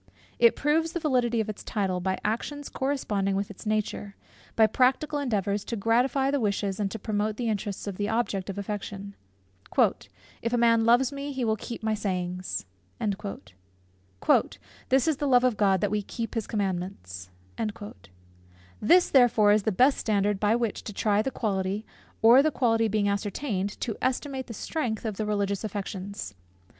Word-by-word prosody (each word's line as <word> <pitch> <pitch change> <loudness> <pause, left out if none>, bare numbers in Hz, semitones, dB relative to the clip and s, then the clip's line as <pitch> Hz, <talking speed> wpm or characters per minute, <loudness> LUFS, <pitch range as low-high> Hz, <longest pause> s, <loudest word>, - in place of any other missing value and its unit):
It 235 -1 +6
proves 320 +3 +1
the 345 - -1
validity 250 -7 +1
of 220 - -4
its 215 - -6
title, 190 -4 -1
by 190 +1 -1
actions 285 +7 -2
corresponding 210 -8 -1
with 200 +1 -2
its 205 - -10
nature, 210 -1 -2 0.4
by 220 - +6
practical 265 +6 +2
endeavours 205 -6 -1
to 235 - -3
gratify 250 +5 +2
the 285 - +1
wishes 200 -2 -1
and 200 -2 0
to 225 - -5
promote 210 0 -2
the 240 - -2
interests 205 -2 -3
of 200 -3 -5
the 205 0 -1
object 210 -4 -1
of 195 - -5
affection. 200 0 -5 1.3
"If 230 +1 -2
a - - +3
man 230 -1 +4
love 240 +3 +4
me, 280 +1 -5
he 260 -2 -1
will 220 -1 +2
keep 230 +1 -7
my 220 0 +1
sayings." 185 - -3 0.3
"This 95 - -2
is 310 -4 +2
the 290 - -1
love 250 -2 +5
of 250 -3 +3
God, 195 -3 +2
that 205 - 0
we 210 0 +1
keep 230 +3 -5
his 225 -3 -2
commandments." 175 - -4 1.5
This 350 +11 +5
therefore 235 -6 +5
is 210 +1 +4
the 220 - 0
best 255 +8 +4
standard 205 -2 +1
by 210 +2 +3
which 235 -3 -2
to 210 - -6
try 205 +1 +2
the 270 - -1
quality, 200 -3 -2 0.4
or, 235 +4 +8
the 310 - +3
quality 225 -5 +2
being 210 -1 +1
ascertained, 200 0 -2
to 225 -4 -2
estimate 265 0 -2
the 230 - -7
strength 240 -7 -3
of 215 -3 -3
the 215 - -2
religious 200 -1 -1
affections. 200 - -5
215 Hz, 170 wpm, -27 LUFS, 200-245 Hz, 1.5 s, or